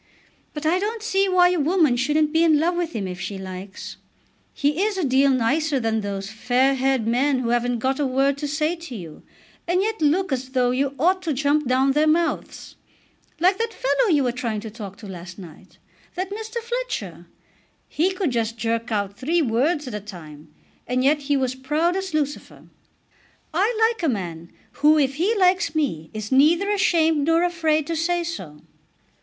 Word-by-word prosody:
But 300 +1 -5
I 340 +4 +2
don't 435 +2 -3
see 390 -3 +1
why 360 -1 +5
a 360 -1 0
woman 310 -3 +3
shouldn't 300 +5 +1
be 325 +1 +4
in 315 -3 +4
love 345 +3 +1
with 345 -2 -2
him 200 -4 -3
if 180 0 -7
she 200 - -4
likes. 190 +1 -8 0.5
He 295 +4 0
is 415 -1 0
a 370 - -1
deal 270 0 +3
nicer 275 +4 +1
than 225 -2 0
those 200 0 -5
fair 250 +4 +2
haired 265 -3 +1
men 260 +4 +2
who 250 -2 -2
haven't 240 0 +1
got 265 +4 -1
a 290 - +1
word 270 +2 +1
to 295 - -3
say 305 +3 0
to 330 -7 -9
you, 170 -7 -9 0.5
and 360 +2 +2
yet 440 -3 -2
look 320 +4 +2
as 260 0 -2
though 250 -1 +2
you 275 +2 -1
ought 370 +6 +2
to 330 -4 -2
jump 290 +1 +1
down 260 +2 +3
their 300 +3 +2
mouths; 330 +2 -1 0.6
like 370 +4 +3
that 455 0 -2
fellow - - +1
you 295 -5 +3
were 250 - +1
trying 235 -3 -3
to 220 -1 -8
talk 205 -3 -9
to 210 - -11
last 175 -1 -9
night; 175 -6 -13 0.4
that 370 +2 -3
Mr. 440 +3 -6
Fletcher. - - -5 0.6
He 335 +5 +1
could 370 -6 -1
just 230 -1 -2
jerk 230 +1 -2
out 200 -1 -2
three 325 +6 +1
words 280 +5 0
at 250 - -6
a 210 - -3
time, 160 -7 -12 0.4
and 255 +1 0
yet 295 +3 +3
he 285 - +3
was 260 -1 0
proud 300 +7 0
as 385 0 -3
Lucifer. 295 -2 -3 0.9
I 415 +7 +1
like 455 - -9
a 325 - +1
man 170 -7 -4 0.3
who 305 +1 +6
if 275 -2 +2
he 395 +8 +1
likes 365 -5 +2
me 165 - -1
is 215 +1 -6
neither 330 +9 +4
ashamed 325 -6 +2
nor 330 +1 +3
afraid 320 -4 +1
to 335 - -3
say 345 +2 0
so." 185 - -7
285 Hz, 195 wpm, -23 LUFS, 235-340 Hz, 0.9 s, who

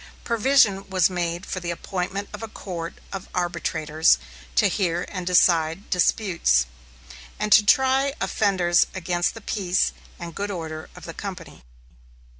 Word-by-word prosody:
Provision 230 -5 +3
was 185 -2 +3
made 175 0 -2
for 185 - -4
the 175 -1 -5
appointment 190 +3 -3
of 210 - -7
a 225 - -5
court 170 -5 -6 0.2
of 195 -1 -6
arbitrators 160 -3 +1 0.4
to 70 - +4
hear 175 -3 0
and 185 -3 -5
decide 170 0 +3
disputes, 170 - +2 0.7
and 210 - -2
to 210 - +8
try 265 +4 +3
offenders 185 -4 +2
against 175 +1 -1
the 225 - -9
peace 185 -3 0 0.2
and 170 -1 -7
good 205 +4 -3
order 160 -4 -6
of - - -11
the 165 - -7
company. 180 - -8
180 Hz, 140 wpm, -24 LUFS, 170-205 Hz, 0.7 s, to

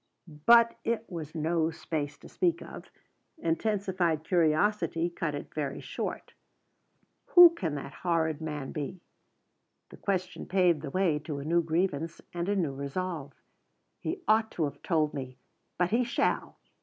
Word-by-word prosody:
But 235 0 +7
it 230 -1 -1
was 160 -2 -6
no 160 +1 +1
space 155 -2 -4
to - - -14
speak 355 -3 0
of; - - -10 0.5
intensified 185 - 0
curiosity 170 0 +2
cut 160 -3 -2
it 145 - -7
very 145 -3 -3
short. - - -5 1.0
"Who 350 -1 +11
can 170 - -3
the 140 - -5
horrid 160 -1 -1
man 150 -4 -4
be?" 150 +5 -5 0.9
The - - -12
question 185 -2 -2
paved 180 -5 +3
the 150 - -5
way 170 -2 +1
to 150 -1 -5
a 140 - -6
new 170 +2 +3
grievance 165 -1 -1
and 175 +2 -2
a 205 - +2
new 165 -8 0
resolve. 140 +1 -4 0.7
"He - - -4
ought 220 +1 +4
to 165 - -1
have 145 -1 -3
told 155 -3 +1
me. 130 -2 -6 0.4
But 180 0 +1
he 240 +3 +3
shall!" 240 - -1
165 Hz, 150 wpm, -29 LUFS, 150-190 Hz, 1.0 s, Who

